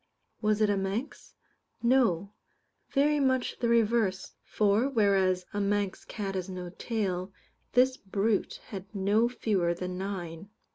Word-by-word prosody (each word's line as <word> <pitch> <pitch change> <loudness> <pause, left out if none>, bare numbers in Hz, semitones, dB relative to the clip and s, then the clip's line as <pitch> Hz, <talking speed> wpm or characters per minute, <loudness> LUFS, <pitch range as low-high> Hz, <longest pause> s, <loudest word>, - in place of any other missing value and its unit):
Was 215 -1 +2
it 215 - +4
a 200 - +1
Manx? 195 +8 -4 0.5
No; 220 -6 +2 0.6
very 295 +1 +3
much 260 -2 +1
the 235 - +1
reverse, 225 -4 +2
for, 215 +5 +2
whereas 195 -6 +2
a 205 - -1
Manx 200 -1 -1
cat 200 -3 -4
has 190 0 -3
no 180 -1 -6
tail, 190 -3 -2 0.4
this 255 +1 +4
brute 200 +2 -1
had 195 -3 -6
no 205 +4 +2
fewer 190 -8 0
than 180 +1 -4
nine. 190 -2 -5
200 Hz, 135 wpm, -29 LUFS, 190-230 Hz, 0.6 s, it